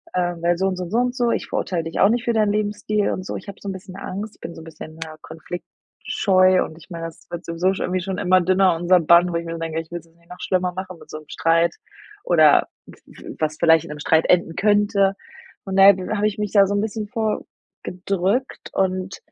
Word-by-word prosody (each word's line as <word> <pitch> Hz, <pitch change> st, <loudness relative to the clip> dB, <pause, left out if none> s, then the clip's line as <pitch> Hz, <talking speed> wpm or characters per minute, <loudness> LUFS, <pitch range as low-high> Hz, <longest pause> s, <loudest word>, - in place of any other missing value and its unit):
Ähm, 175 Hz, -2 st, -1 dB
weil 170 Hz, 0 st, +2 dB
so 190 Hz, -, 0 dB
und 190 Hz, -1 st, -2 dB
so 180 Hz, -, -3 dB
und 170 Hz, -, -10 dB
so 225 Hz, -, +1 dB
und 250 Hz, +1 st, +1 dB
so. 240 Hz, -2 st, +1 dB
Ich -, -, -2 dB
verurteile 175 Hz, -4 st, -2 dB
dich 165 Hz, 0 st, -5 dB
auch 195 Hz, -, +6 dB
nicht 240 Hz, +2 st, 0 dB
für 235 Hz, -, 0 dB
deinen 215 Hz, -2 st, +2 dB
Lebensstil 210 Hz, 0 st, -1 dB
und 185 Hz, -, -4 dB
so.“ -, -, -5 dB
Ich 195 Hz, -, -8 dB
habe 200 Hz, -, -10 dB
so -, -, -8 dB
'n -, -, -3 dB
bisschen 190 Hz, 0 st, -10 dB
Angst, 200 Hz, +2 st, -6 dB
bin 165 Hz, -, -8 dB
so -, -, -10 dB
'n -, -, -12 dB
bisschen, 160 Hz, 0 st, -11 dB
ja, 155 Hz, -1 st, -10 dB
Konfliktscheu. 185 Hz, +3 st, 0 dB
Und 160 Hz, -, -9 dB
ich 170 Hz, -, -18 dB
meine, 165 Hz, -2 st, -6 dB
das 165 Hz, -, -11 dB
wird 175 Hz, 0 st, -7 dB
sowieso 175 Hz, +3 st, 0 dB
schon 190 Hz, -, -4 dB
irgendwie 185 Hz, 0 st, -1 dB
schon 190 Hz, +1 st, -4 dB
immer 185 Hz, -2 st, +3 dB
dünner 185 Hz, 0 st, +3 dB
unser 175 Hz, +2 st, +3 dB
Band, 170 Hz, +2 st, +5 dB
wo -, -, -4 dB
ich 170 Hz, 0 st, -2 dB
mir 165 Hz, 0 st, -5 dB
denke, 165 Hz, -1 st, -3 dB
ich 165 Hz, -, -17 dB
will 175 Hz, -, -4 dB
es 165 Hz, -, -20 dB
jetzt 165 Hz, 0 st, -27 dB
nicht 170 Hz, 0 st, -28 dB
noch 180 Hz, -, -11 dB
schlimmer 185 Hz, -1 st, 0 dB
machen 185 Hz, -1 st, -7 dB
mit -, -, -16 dB
so -, -, -6 dB
'nem 155 Hz, -, -18 dB
Streit 165 Hz, +1 st, +1 dB, 0.5 s
oder 155 Hz, -4 st, +5 dB, 0.2 s
w -, -, -14 dB
w -, -, -11 dB
was 155 Hz, -1 st, -1 dB
vielleicht 165 Hz, -1 st, +4 dB
in -, -, -11 dB
'nem 150 Hz, 0 st, -7 dB
Streit 160 Hz, +2 st, +2 dB
enden 175 Hz, -2 st, +2 dB
könnte. 205 Hz, -1 st, +2 dB, 0.5 s
Und 190 Hz, -1 st, -4 dB
da 195 Hz, 0 st, +9 dB, 0.3 s
habe 210 Hz, 0 st, 0 dB
ich 210 Hz, 0 st, -4 dB
mich 210 Hz, -2 st, -2 dB
da 200 Hz, -2 st, +6 dB
so 200 Hz, -, -2 dB
'n 205 Hz, -, +1 dB
bisschen 215 Hz, 0 st, -4 dB
vor 220 Hz, -1 st, -2 dB, 0.4 s
gedrückt 195 Hz, +7 st, -2 dB
und 185 Hz, 0 st, -1 dB
185 Hz, 255 wpm, -22 LUFS, 170-200 Hz, 0.5 s, da